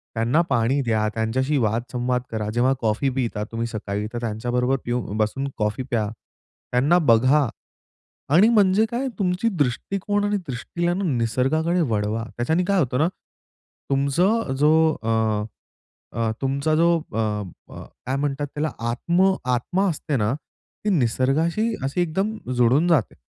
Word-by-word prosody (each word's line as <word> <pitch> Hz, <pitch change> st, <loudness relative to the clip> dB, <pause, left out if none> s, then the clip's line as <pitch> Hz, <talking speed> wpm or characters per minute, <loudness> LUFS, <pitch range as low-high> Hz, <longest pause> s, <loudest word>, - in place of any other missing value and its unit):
त्यांना 120 Hz, +8 st, +2 dB
पाणी 125 Hz, +2 st, +2 dB
द्या, 110 Hz, -4 st, +1 dB
त्यांच्याशी 130 Hz, +6 st, 0 dB
वाद-संवाद 120 Hz, +3 st, -1 dB
करा. 110 Hz, -2 st, -2 dB
जेव्हा 125 Hz, +3 st, +3 dB
कॉफी 115 Hz, +4 st, +1 dB
पिता 115 Hz, -5 st, -1 dB
तुम्ही 115 Hz, 0 st, -2 dB
सकाळी, 105 Hz, -2 st, -4 dB
तर 120 Hz, -, -3 dB
त्यांच्याबरोबर 120 Hz, +3 st, 0 dB
पियू 120 Hz, +1 st, -1 dB, 0.2 s
बसून 110 Hz, +6 st, -1 dB
कॉफी 105 Hz, +3 st, -1 dB
प्या. 110 Hz, -3 st, 0 dB, 0.6 s
त्यांना 140 Hz, +8 st, +4 dB
बघा 130 Hz, +5 st, +4 dB, 0.9 s
आणि 195 Hz, +6 st, +7 dB
म्हणजे 210 Hz, -2 st, +4 dB
काय? 250 Hz, +3 st, -1 dB
तुमची 185 Hz, +3 st, +1 dB
दृष्टिकोन 195 Hz, -, -1 dB
आणि 205 Hz, 0 st, +1 dB
दृष्टीला 170 Hz, +8 st, -2 dB
निसर्गाकडे 145 Hz, -, +1 dB
वळवा. 110 Hz, -4 st, -1 dB
त्याच्याने 160 Hz, +9 st, +1 dB
काय 200 Hz, 0 st, +2 dB
होतं 125 Hz, -6 st, 0 dB
ना 155 Hz, -, +3 dB, 0.8 s
तुमचं 140 Hz, +7 st, +1 dB
जो 150 Hz, +1 st, +5 dB, 0.3 s
अ, 110 Hz, -, -2 dB, 1.1 s
अ, 115 Hz, -1 st, +1 dB
तुमचा 140 Hz, +3 st, 0 dB
जो 170 Hz, +2 st, +4 dB, 0.2 s
अ, -, -, -3 dB
अ, 105 Hz, -4 st, -4 dB, 0.2 s
काय 130 Hz, -, -1 dB
म्हणतात 145 Hz, 0 st, -2 dB
त्याला? 150 Hz, 0 st, -1 dB, 0.2 s
आत्म 175 Hz, +10 st, +2 dB, 0.2 s
आत्मा 185 Hz, +11 st, 0 dB
असते 155 Hz, -2 st, -3 dB
ना 105 Hz, +1 st, +1 dB, 0.5 s
ती -, -, +2 dB
निसर्गाशी 155 Hz, -, +1 dB
अशी 140 Hz, +6 st, -1 dB
एकदम 190 Hz, +6 st, -1 dB, 0.2 s
जुळून 125 Hz, +7 st, +3 dB
जाते. 155 Hz, -, +2 dB
135 Hz, 135 wpm, -23 LUFS, 115-170 Hz, 1.1 s, आणि